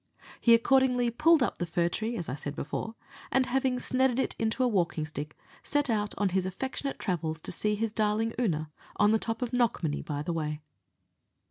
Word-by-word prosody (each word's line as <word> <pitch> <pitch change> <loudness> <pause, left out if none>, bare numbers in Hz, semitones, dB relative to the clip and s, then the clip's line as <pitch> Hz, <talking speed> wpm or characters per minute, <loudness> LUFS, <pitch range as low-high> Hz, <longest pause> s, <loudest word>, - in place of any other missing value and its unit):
He 235 -1 +6
accordingly 250 0 +3
pulled 305 +3 +4
up - - -2
the 175 - 0
fir 170 0 +1
tree, 220 +7 -2
as 170 - -4
I 125 - -3
said 145 +1 -5
before, 220 +11 -4 0.4
and 265 -1 +3
having 260 0 +1
snedded 255 0 +1
it 265 - 0
into 225 +3 0
a - - +4
walking 175 -8 0
stick, 150 -1 -6 0.2
set 290 -3 0
out 210 -2 -1
on 205 -1 +2
his 185 0 0
affectionate 265 +8 -3
travels 160 -5 -2
to - - -4
see 210 +4 0
his 220 0 -2
darling 220 +1 +1
Oonagh 155 -10 0 0.2
on 205 - +4
the 220 - +3
top 225 +3 -2
of 245 0 -4
Knockmany, 225 -11 +1
by 145 -1 -3
the 170 +2 -2
way. 150 -2 -2
220 Hz, 200 wpm, -29 LUFS, 170-250 Hz, 0.4 s, He